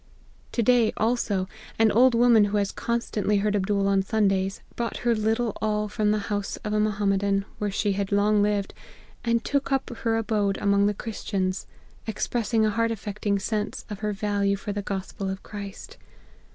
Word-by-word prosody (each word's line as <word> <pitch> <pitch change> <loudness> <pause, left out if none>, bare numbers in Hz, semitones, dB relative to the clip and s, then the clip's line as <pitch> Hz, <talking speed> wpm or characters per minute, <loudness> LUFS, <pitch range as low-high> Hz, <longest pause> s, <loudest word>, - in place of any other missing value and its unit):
" - - -30
To 235 - +1
day, 240 -1 +4
also, 215 -5 0 0.3
an 225 -1 +4
old 245 +2 +5
woman 230 -3 +6
who 205 +1 0
has 200 -1 0
constant 235 -3 -2
ly 210 - +4
heard 205 +1 +1
Abdool 200 0 +1
on 195 -1 +3
Sundays, 195 -2 0
brought 235 -1 -2
her 240 - +4
little 225 +1 0
all 210 0 0
from 210 0 0
the 210 - +3 0.2
house 205 -1 -2
of 210 - -1
a 210 - +2
Mohammedan, 200 -1 +1
where 210 - 0
she 200 +1 0
had 195 0 -2
long 205 +1 +3
lived, 205 -1 0 0.5
and 235 -1 +1
took 280 -1 0
up 270 -2 0
her 225 -1 0
abode 210 -3 0
among 200 0 +3
the 205 - 0
Chris 225 +1 -6
tians, 185 -2 -1 0.4
expressing 225 +1 0
a 215 - +2
heart 230 +2 +1
affecting 205 -2 -2
sense 210 +1 -3
of 205 - -5
her 210 -1 -1
value 200 0 0
for 200 +1 -5
the 205 - -2
Gospel 195 0 -4
of 190 0 -5
Christ. 200 -2 -8
210 Hz, 190 wpm, -26 LUFS, 200-225 Hz, 0.5 s, woman